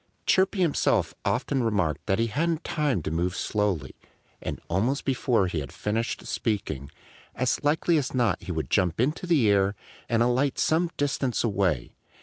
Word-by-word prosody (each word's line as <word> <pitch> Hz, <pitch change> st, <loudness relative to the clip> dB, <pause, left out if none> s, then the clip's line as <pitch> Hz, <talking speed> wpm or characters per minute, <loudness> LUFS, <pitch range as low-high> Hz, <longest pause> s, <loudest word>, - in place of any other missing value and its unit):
Chirpy 190 Hz, +1 st, +3 dB
himself 165 Hz, -5 st, +2 dB
often 130 Hz, +2 st, 0 dB
remarked 95 Hz, -, 0 dB
that 95 Hz, -1 st, +2 dB
he 115 Hz, -, +2 dB
hadn't 160 Hz, +8 st, -1 dB
time 145 Hz, -, 0 dB
to 75 Hz, -, -3 dB
move 85 Hz, +3 st, -1 dB
slowly. 100 Hz, -10 st, -1 dB, 0.5 s
And -, -, -4 dB
almost 115 Hz, +11 st, 0 dB
before 125 Hz, -6 st, +2 dB
he 90 Hz, -3 st, -2 dB
had 70 Hz, -, -6 dB
finished 110 Hz, +3 st, -2 dB
speaking, 100 Hz, -, -2 dB, 0.5 s
as 130 Hz, +2 st, 0 dB
likely 160 Hz, +3 st, +2 dB
as 130 Hz, -, -3 dB
not 115 Hz, -8 st, +1 dB
he -, -, -6 dB
would 80 Hz, -6 st, -3 dB
jump 90 Hz, 0 st, +2 dB
into 150 Hz, +8 st, 0 dB
the 150 Hz, -10 st, +4 dB
air 100 Hz, 0 st, +3 dB, 0.3 s
and 115 Hz, 0 st, +3 dB
alight 125 Hz, +3 st, +1 dB
some 165 Hz, +2 st, +2 dB
distance 135 Hz, -3 st, 0 dB
away. 95 Hz, -, 0 dB
115 Hz, 160 wpm, -26 LUFS, 95-140 Hz, 0.5 s, the